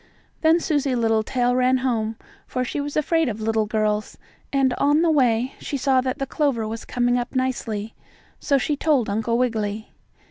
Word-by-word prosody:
Then 320 +1 +4
Susie 290 -5 0
Littletail 235 +2 +1
ran 255 +1 +3
home, 230 -4 -1 0.3
for 255 - -2
she 285 - -3
was 290 +1 -4
afraid 325 -1 +2
of 220 -1 -5
little 220 0 0
girls, 215 -1 -1 0.3
and 270 -2 +2
on 295 +3 +3
the 335 - +3
way 250 -3 +2
she 280 - -4
saw 265 -1 +2
that 255 0 -2
the 275 - -2
clover 270 -6 0
was 225 +1 -6
coming 245 0 +1
up 245 +2 -5
nicely, 230 -5 -2 0.5
so 280 - +2
she 290 +3 0
told 285 -8 +1
Uncle 225 +3 0
Wiggily. 220 -3 -2
250 Hz, 175 wpm, -23 LUFS, 225-275 Hz, 0.5 s, Then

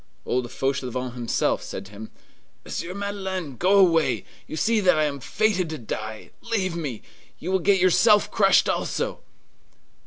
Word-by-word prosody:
Old 125 -1 -1
Fauchelevent 130 -2 -2
himself 120 -2 0
said 95 - -7
to 95 - -14
him, 110 +2 -9 0.6
"Monsieur 180 +2 -5
Madeleine, 190 -7 -4
go 190 +8 +3
away! 170 -5 +3 0.2
You - - -6
see 225 +5 +2
that 180 -5 +4
I 155 - +3
am 145 -2 -2
fated 195 - 0
to 155 - -4
die! 110 -2 -6
Leave 195 -7 -1
me! 140 -10 -5 0.3
You 180 - -5
will 190 - +2
get 195 +2 +3
yourself 205 +4 +4
crushed - - +4
also!" - - -2
170 Hz, 155 wpm, -24 LUFS, 125-195 Hz, 0.6 s, that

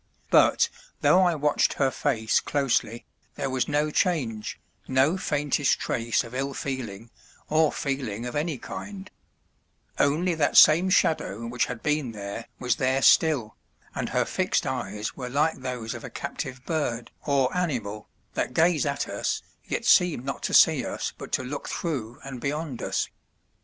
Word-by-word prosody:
But - - +5 0.3
though 185 - +5
I 175 -2 +3
watched 150 -1 +2
her 135 -2 +1
face 110 -2 +1
closely 125 -5 -1 0.3
there 135 -2 -3
was 130 -1 0
no 150 +1 +1
change, 125 -13 -1 0.3
no 135 +6 +3
faintest 145 -5 +1
trace 115 -1 0
of 115 - -11
ill 135 +1 -2
feeling 115 -5 -5 0.4
or 155 0 +3
feeling 125 -6 -3
of 125 - -5
any 150 0 -1
kind; 195 +7 -8 0.9
only 160 +6 +2
that 155 -3 +1
same 170 +5 +7
shadow 115 - +1
which 120 +1 0
had 125 -2 -6
been 150 -5 0
there 100 +2 -6
was 125 -3 0
there 135 0 +1
still, 140 -10 +4 0.4
and - - -3
her - - +1
fixed - - 0
eyes 105 +1 -3
were 125 -2 -5
like 150 +5 +1
those 125 -3 -4
of - - -8
a - - -6
captive 130 0 -6
bird 135 -8 -2 0.2
or 135 -1 +2
animal, 120 - -2 0.2
that 125 - -2
gaze 165 -3 +3
at - - -2
us, - - -2 0.2
yet - - -3
seem 170 -8 +4
not 135 - -4
to - - -3
see - - +6
us - - -4
but - - -10
to - - +1
look 140 +3 -5
through 125 -9 -4
and 130 -3 -7
beyond 145 -2 -3
us. - - -1
135 Hz, 160 wpm, -26 LUFS, 120-155 Hz, 0.9 s, same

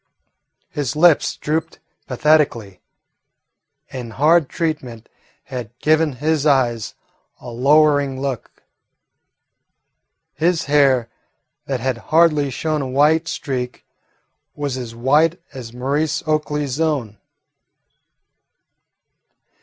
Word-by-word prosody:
His 145 -4 -3
lips 160 0 +3
drooped 160 +2 -3 0.3
pathetically, 125 -8 +1 1.1
and 120 -4 -7
hard 155 +2 +3
treatment 140 -9 -4 0.4
had 120 -2 -8
given 155 0 +2
his 150 +3 -1
eyes 125 -7 +1 0.4
a - - -10
lowering 145 +1 +3
look. 135 -4 -5 1.7
His 170 +1 0
hair, 140 -5 +3 0.6
that 130 -3 -2
had 130 -1 -2
hardly 155 -3 +3
shown 155 +4 -2
a 135 - -3
white 150 +5 +2
streak, 130 -6 -4 0.7
was 145 -3 -3
as 120 -3 -7
white 150 +8 +2
as 125 -4 -8
Maurice 145 +5 -1
Oakley's 150 -2 -1
own. 130 -10 -1
140 Hz, 90 wpm, -20 LUFS, 125-155 Hz, 1.7 s, lips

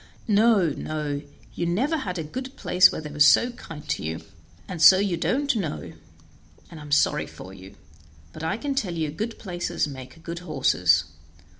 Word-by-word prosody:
No, 210 -4 +4
no! 150 -1 -4 0.3
you 170 - -2
never 250 - 0
had 190 -10 -4
a 165 - -3
good 260 - -7
place 180 +1 +5
where - - -5
they 150 -1 -8
were 150 +11 +5
kind 160 -10 -11
to - - -2
you, 80 +1 -4 0.5
and 175 -3 -6
so 185 +3 +9
you 195 -2 0
don't 275 - 0
know, 75 - -4 0.8
and 160 - -10
I'm 150 -1 -11
sorry 145 - +2
for 95 - -11
you; 95 0 -13 0.6
but - - -9
I 165 +6 -1
can 280 +3 -3
tell 205 -11 -2
you 155 -3 -2
good 220 +9 -5
places 175 -5 -3
make 130 +3 -10
good 170 0 -6
horses. 90 - +2
170 Hz, 175 wpm, -25 LUFS, 145-210 Hz, 0.8 s, so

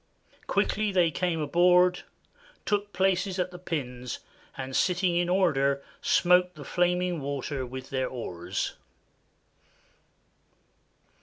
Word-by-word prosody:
Quickly 215 -1 +1
they 175 -4 +3
came 175 0 -1
aboard, 180 +3 +4 0.6
took 205 0 0
places 190 0 +1
at 180 0 -1
the 180 - -9
pins, 125 -8 -4 0.4
and 130 0 -5
sitting 180 -1 +2
in 175 0 +1
order 140 -7 +2 0.2
smote 180 0 +3
the 145 -2 -10
flaming 180 0 0
water 140 -1 -3
with 130 +1 -8
their 130 -1 0
oars. 90 -7 -4
175 Hz, 105 wpm, -28 LUFS, 135-180 Hz, 0.6 s, aboard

